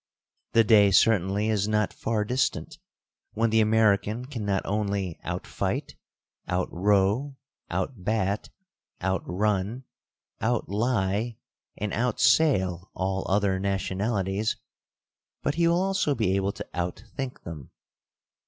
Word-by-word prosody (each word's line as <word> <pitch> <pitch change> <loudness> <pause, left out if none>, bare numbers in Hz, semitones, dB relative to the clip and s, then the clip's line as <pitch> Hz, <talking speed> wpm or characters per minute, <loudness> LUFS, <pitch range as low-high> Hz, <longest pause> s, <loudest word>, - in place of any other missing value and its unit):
The 115 0 +6
day 105 -2 +6
certainly 100 0 +3
is 105 -2 +1
not 105 0 +1
far 110 -2 -1
distant, 140 +6 -1 0.5
when 115 +1 +1
the 110 0 +4
American 110 +1 +2
can 130 -5 -5
not 100 -2 0
only 100 -4 -1
out - - -4
fight, - - -3 0.5
out 90 0 -1
row, 105 +9 +2 0.3
out 120 -10 -3
bat, 100 -1 0 0.5
out 95 +1 0
run, 105 +6 -1 0.6
out 120 +1 0
lie, 110 0 0 0.4
and 105 -1 -3
out 120 -1 0
sail 95 - +3
all 95 0 -2
other 95 -1 +2
nationalities; 100 +2 -1 0.9
but 145 - +1
he 170 +1 +2
will 170 +2 +3
also 190 -7 +1
be 110 -6 +1
able 100 0 +1
to - - -7
out 90 +3 -3
think 135 -2 -5
them. 75 -6 -8
105 Hz, 125 wpm, -27 LUFS, 95-115 Hz, 0.9 s, The